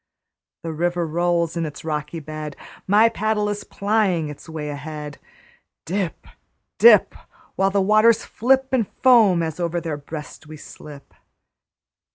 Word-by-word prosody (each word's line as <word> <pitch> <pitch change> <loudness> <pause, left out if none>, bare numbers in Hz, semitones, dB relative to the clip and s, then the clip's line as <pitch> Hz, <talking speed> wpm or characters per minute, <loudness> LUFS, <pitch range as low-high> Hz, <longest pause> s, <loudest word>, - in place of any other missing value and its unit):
The 165 -1 -4
river 175 +2 -1
rolls 170 +1 0
in 170 - -1
its 150 0 -7
rocky 150 +1 -4
bed; 155 -1 -7 0.3
My 210 +4 +5
paddle 215 -2 -1
is 205 0 -4
plying 200 -6 0
its 150 +3 -11
way 155 -2 -5
ahead; 150 0 -7 0.7
Dip, 185 0 -3 0.5
dip, 475 - +7 0.4
While 195 0 +2
the 195 0 +1
waters 215 +3 +4
flip 265 +3 +1
In 240 -4 +2 0.2
foam 220 -9 +5
as 160 +1 -5
over 175 0 -1
their 160 -3 -4
breast 150 +1 -9
we 155 0 -10
slip. 145 -1 -13
170 Hz, 140 wpm, -22 LUFS, 155-205 Hz, 0.7 s, dip